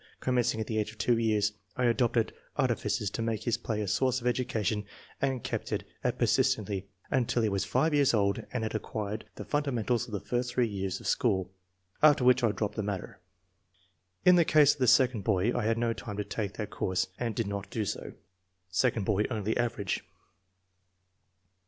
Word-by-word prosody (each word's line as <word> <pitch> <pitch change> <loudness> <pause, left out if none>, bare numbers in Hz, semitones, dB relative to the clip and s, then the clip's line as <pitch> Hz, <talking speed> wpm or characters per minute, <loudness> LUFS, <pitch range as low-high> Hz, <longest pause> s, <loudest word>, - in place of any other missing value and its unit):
Commencing 125 -3 +1
at 110 - -1
the 110 0 -1
age 105 0 -2
of 110 - -17
two 115 +1 +2
years 105 -2 +2 0.3
I 125 - +1
adopted 120 -1 +2 0.2
artifices 100 -3 0
to 115 - -3
make 115 -2 -1
his 120 - +1
play 110 -2 -2
a 105 - -2
source 130 +5 +1
of 120 - -11
education 110 -4 0 0.4
and 135 -3 0
kept - - -3
at - - -1 0.2
it - - 0
persistently 100 -2 +1 0.2
until 120 -2 +1
he 110 - +2
was 100 -1 -1
five 160 0 +1
years 140 -2 +4
old 100 -3 +1
and 125 -3 -2
had 110 - -3
acquired 105 0 -4
the - - -7
fundamentals 125 -5 0
of - - -11
the 100 - -1
first 120 +3 -2
three 125 - +3
years 95 -2 -3
of - - -13
school, 95 -8 +1 0.5
after 145 -4 +6
which 125 0 +5
I 115 - +4
dropped 105 +1 -3
the - - +1
matter. 100 -3 -5 1.1
In 180 0 +8
the 170 - +6
case 150 -3 +5
of - - -16
the 130 - +2
second 125 -4 +4
boy, 105 +3 +1
I 120 - 0
had 115 +1 +2
no 115 0 +1
time 105 -3 -7
to 105 - -1
take 100 -1 -4
that 105 -2 -5
course 95 0 0
and 115 -3 -2
did 115 - 0
not 100 -1 -4
do 110 0 -2
so." - - -4 0.6
(Second 115 0 +1
boy 105 0 +2
only 110 -2 -1
average.) 115 -5 -1
115 Hz, 195 wpm, -29 LUFS, 105-125 Hz, 1.1 s, In